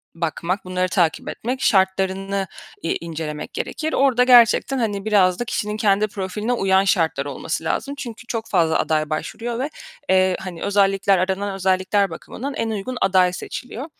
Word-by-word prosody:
bakmak, 170 +3 -2
bunları 185 0 -1
takip 170 -4 +1
etmek, 255 +3 -4
şartlarını 195 -1 +1 0.4
i 165 - 0
incelemek 160 -2 -5
gerekir. 315 0 -3
Orada 260 -3 +4
gerçekten, 250 +2 +5
hani 205 -4 -2
biraz 190 -3 +3
da 240 - -2
kişinin 210 -2 -2
kendi 210 0 +2
profiline 210 +4 -3
uyan 195 -3 +3
şartlar 160 -7 +1
olması 145 +3 -4
lazım. 280 +11 -2
Çünkü 235 -3 -8
çok 225 -1 -3
fazla 165 -4 +2
aday 155 -1 0
başvuruyor 230 +9 -4
ve, 280 +3 -1 0.4
eee, 185 -1 +3
hani 180 -3 -7
özellikler 195 -1 +3
aranan 190 +2 -1
özellikler 190 +1 +1
bakımından 270 +11 -6
en 225 - -1
uygun 220 +4 -4
aday 185 -2 +3
seçiliyor. 250 +7 -6
195 Hz, 155 wpm, -21 LUFS, 185-225 Hz, 0.4 s, gerçekten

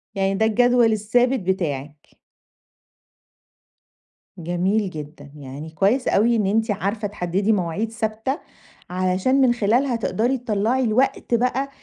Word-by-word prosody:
يعني 195 0 0
ده 220 +3 +2
الجدول 245 +1 +3
الثابت 245 +5 +1
بتاعِك. 150 -6 -4 2.2
جميل 185 +4 0
جدًا. 150 -2 -10
يعني 145 +2 -8
كويّس 200 +11 +1
أوي 230 +4 +3
إن 210 -3 +1
أنتِ 220 +2 +1
عارفة 205 +2 -2
تحددي 195 +1 -1
مواعيد 200 +3 -1
ثابتة، 225 +5 -3 0.5
علشان 185 +9 +1
من 250 -2 +4
خلالها 240 +3 +1
تقدري 235 +3 0
تطلَّعي 235 +2 0
الوقت 250 +2 0
بقى 255 +3 +1
215 Hz, 115 wpm, -22 LUFS, 185-240 Hz, 2.2 s, من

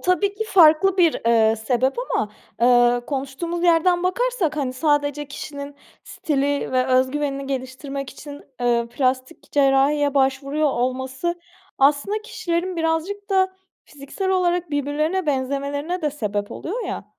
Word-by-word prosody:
tabii 365 +3 +1
ki 440 - -3
farklı 365 -1 +5
bir, 340 -4 +3
eee, 225 -1 +4
sebep 250 +4 0
ama, 220 - -2 0.3
eee, 245 0 +4
konuştuğumuz 285 +5 -4
yerden 350 +1 +3
bakarsak, 370 -4 0
hani, 265 -3 -1
sadece 290 0 0
kişinin 280 0 -7 0.3
stili 285 -2 -1
ve 255 0 +2
öz 260 0 +3
güvenini 275 -1 -3
geliştirmek 275 +1 -5
için, 285 +1 -10 0.2
eee, 235 -1 +1
plastik 260 +3 -2
cerrahiye 285 +1 +3
başvuruyor 275 +2 +1
olması 260 +6 -2 0.4
aslında 295 +10 +2
kişilerin 350 -2 -3
birazcık 335 +6 -2
da 375 -1 +2 0.3
fiziksel 290 +7 -6
olarak 355 -2 +1
birbirlerine 305 +5 -1
benzemelerine 285 +5 -2
de 300 - +1
sebep 205 -7 -3
oluyor 445 +9 -5
ya. - - -5
290 Hz, 130 wpm, -22 LUFS, 265-345 Hz, 0.4 s, farklı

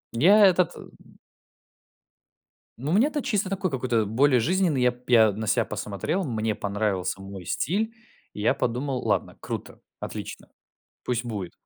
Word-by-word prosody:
Я 200 - +6
этот, 180 -2 +3
э - - -10 2.0
Ну, 135 +6 -3
мне-то 280 - +2
чисто 205 -7 -1
такой 195 -1 -1
какой-то 125 -5 0
более 125 +5 +3
жизненный. 170 -1 +1
Я 125 - +4
п 125 0 -18
я 110 -3 +7
на 110 +3 -5
себя - - +2
посмотрел, 155 - -3
мне 110 -6 -1
понравился 100 -2 -2
мой 95 -2 -9
стиль. 210 - -1 0.4
Я 105 +1 +1
подумал: 125 +2 -1
"Ладно, - - -1
круто, - - -6 0.2
отлично, - - -7 0.6
пусть 120 -1 -2
будет". 100 -7 -5
125 Hz, 140 wpm, -25 LUFS, 110-185 Hz, 2.0 s, я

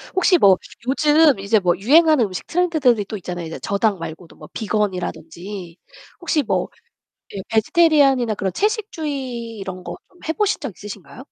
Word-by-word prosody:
혹시 370 -1 +4
뭐 195 - +5 0.3
요즘 295 -2 +4
이제 205 +2 +2
뭐 175 -2 +1
유행하는 300 - +4
음식 185 -3 -6
트렌드들이 310 - +2
또 215 - -6
있잖아요. 175 -2 -6
이제 160 - -7
저당 200 -1 0
말고도 165 +1 -9
뭐 - - -13
비건이라든지 185 -3 -4 0.4
혹시 310 -4 0
뭐 - - -1 0.6
예 195 - -5
vegetarian이나 270 - +3
그런 190 -2 -3
채식주의 285 - -3
이런 185 -2 -7
거 - - -6
좀 360 - -25
해 - - +1
보신 420 +1 0
적 275 -7 -5
있으신가요? 210 +4 -10
220 Hz, 385 characters per minute, -20 LUFS, 190-305 Hz, 0.6 s, 뭐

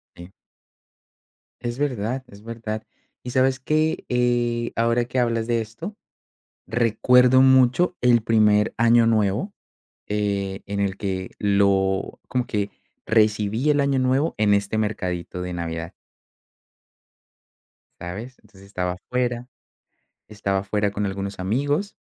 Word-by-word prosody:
Sí. 85 +2 -12 1.3
Es 120 0 -4
verdad, 130 -2 -2
es 100 0 -15
verdad. 110 -1 -5 0.4
Y, 125 - -6
¿sabes 130 +1 +2
qué?, 155 +4 0
eh, 120 -1 +1
ahora 115 +1 +2
que 125 +2 -2
hablas 115 -2 +1
de 115 0 0
esto, 115 - -8 0.7
recuerdo 125 +3 +4
mucho 130 +7 +4
el 120 -2 +4
primer 105 -2 +3
Año 115 0 +5
Nuevo, 110 - +1 0.6
eh, 100 -2 -2
en 100 0 -3
el 100 -1 -1
que 95 -2 -4
lo 100 -1 +1
como 125 -1 -1
que 100 -2 -1 0.4
recibí 110 +4 +2
el 145 - +3
Año 140 -1 +1
Nuevo 130 +5 +1
en 105 -1 +2
este 100 +1 +1
mercadito 90 -4 -3
de 90 0 -4
Navidad. 85 -1 -5 2.1
¿Sabes? 105 +9 -7
Entonces 95 -3 -19
estaba 90 -2 -2
afuera 125 +5 -3 0.8
estaba 100 -2 -1
afuera 105 +1 -1
con 105 +1 -2
algunos 100 0 -4
amigos 145 - -1
110 Hz, 120 wpm, -23 LUFS, 100-125 Hz, 2.1 s, Año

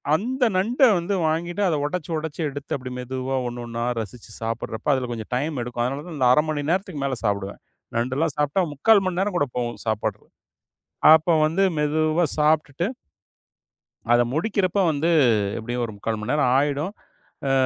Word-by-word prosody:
அந்த 250 +7 -1
நண்ட 230 +9 0 0.2
வந்து 175 +4 -2
வாங்கிட்டு 170 +4 -1
அத 165 - +1
உடைச்சு 170 +1 -4
உடைச்சு 160 +1 -5
எடுத்து 145 0 -5
அப்டி 130 -2 -6
மெதுவா 130 +1 -3
ஒண்ணொண்ணா 120 -1 -5 0.2
ரசிச்சு 110 +1 -8
சாப்பிடுறப்ப 115 +4 -2
அதுல 125 -2 -1
கொஞ்சம் 115 0 -6
டைம் 145 +1 -2
எடுக்கும். 120 0 -3
அதனாலதான் 145 +4 -5
நான் 125 0 +6
1/2 150 - +4
மணி 145 -1 -1
நேரத்துக்கு 185 -6 -1
மேல 135 -2 -1
சாப்பிடுவேன். 100 -1 -2 0.4
நண்டுலாம் 130 +7 0
சாப்பிட்டா 150 +6 +1
3/4 200 +7 +4
மணி 185 -1 -1
நேரம் 195 -1 0
கூட 145 - +1
போகும் 120 -3 -3
சாப்பட் 110 -1 -1 0.9
அப்ப 160 +1 +4
வந்து 170 +5 +1
மெதுவா 155 +3 +1
சாப்பிட்டுட்டு 150 +2 +1 1.2
அத 120 0 +6
முடிக்கிறப்ப 195 +2 0
வந்து, 155 +3 0 0.5
எப்டியும் 120 +2 -3
ஒரு 110 - -7
3/4 110 +1 -3
மணி 105 - -3
நேரம் 145 -4 +2
ஆயிடும். 145 +7 0 0.6
ஆ - - +2
145 Hz, 155 wpm, -23 LUFS, 125-170 Hz, 1.2 s, நான்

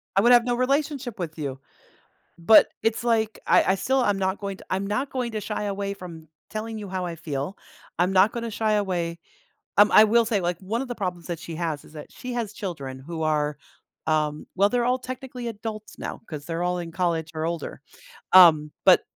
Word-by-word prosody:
I 195 - +5
would 240 +3 +5
have 240 -1 +7
no 245 - +1
relationship 270 -2 -1
with 165 -2 -5
you, 135 -3 -4 0.8
but 190 +6 +7
it's 225 0 0
like, 225 -2 +1
I 190 - +4
I - - +2
still 260 +6 +1
am 205 -3 +1
not 190 0 0
going 195 -1 -4
to - - -13
I'm 190 +1 -1
not 255 +7 -1
going 250 -3 -3
to 215 - -2
shy 210 +1 -3
away 200 0 -2
from 165 -4 -10 0.2
telling 220 +1 -4
you 205 - -7
how 185 -1 -3
I 170 - -5
feel, 150 +2 -4 0.4
I'm 180 +2 +2
not 195 +3 +5
gonna 235 -1 -4
shy 215 0 0
away 175 -5 -1 0.6
um, 205 +1 +7
I 215 - +9
will 230 +2 +4
say, 215 -3 0
like, 175 -1 -1
one 220 +6 -2
of 270 - -6
the 245 - -3
problems 180 -4 -4
that 170 -3 -4
she 165 0 -7
has 160 -3 -3
is - - -17
that 150 -1 -10
she 250 0 -7
has 230 -4 -2
children 140 -11 -6
who 160 +3 -5
are, 150 -1 0 0.5
um, 155 -1 0
well, 200 +2 +4
they're 245 +2 +1
all 250 +1 +2
technically 255 -1 -7
adults 215 -1 -6
now, - - -6
'cause 150 -4 -6
they're 165 0 -3
all 180 0 0
in 170 -1 -6
college 165 -2 -1
or 160 0 -2
older, 170 0 -4 0.5
um, 155 -5 +8 0.2
but - - +7
195 Hz, 215 wpm, -25 LUFS, 165-225 Hz, 0.8 s, I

